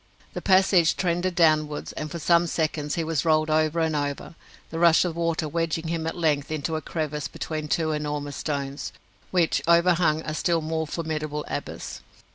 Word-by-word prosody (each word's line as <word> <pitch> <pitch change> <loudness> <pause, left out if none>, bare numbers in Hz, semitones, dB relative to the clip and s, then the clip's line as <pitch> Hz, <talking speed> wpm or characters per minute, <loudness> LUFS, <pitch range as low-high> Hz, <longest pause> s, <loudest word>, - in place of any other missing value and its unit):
The - - -4
passage 185 -3 +4
trended 175 0 0
downwards, 155 -3 +2
and 155 - -5
for 170 - -5
some 170 +1 +3
seconds 155 -2 -1
he 165 - -1
was 160 -2 -1
rolled 155 -1 +2
over 155 +1 +2
and 160 -1 +1
over, 145 +2 -3 0.4
the 165 - -3
rush 170 0 +5
of 170 -2 -2
water 165 -1 -1
wedging 165 +1 -2
him 165 -1 -2
at 165 - -3
length 150 -3 +1
into 155 +1 -2
a 155 - -2
crevice 150 -3 -3
between 155 -1 -5
two 155 +1 0
enormous 150 -2 -3
stones, 140 -2 -4 0.4
which 175 -3 +2
overhung 170 -2 +4
a 155 - -4
still 165 +1 +1
more 160 0 -2
formidable 155 -2 -3
abyss. - - -5
160 Hz, 175 wpm, -25 LUFS, 150-170 Hz, 0.4 s, rush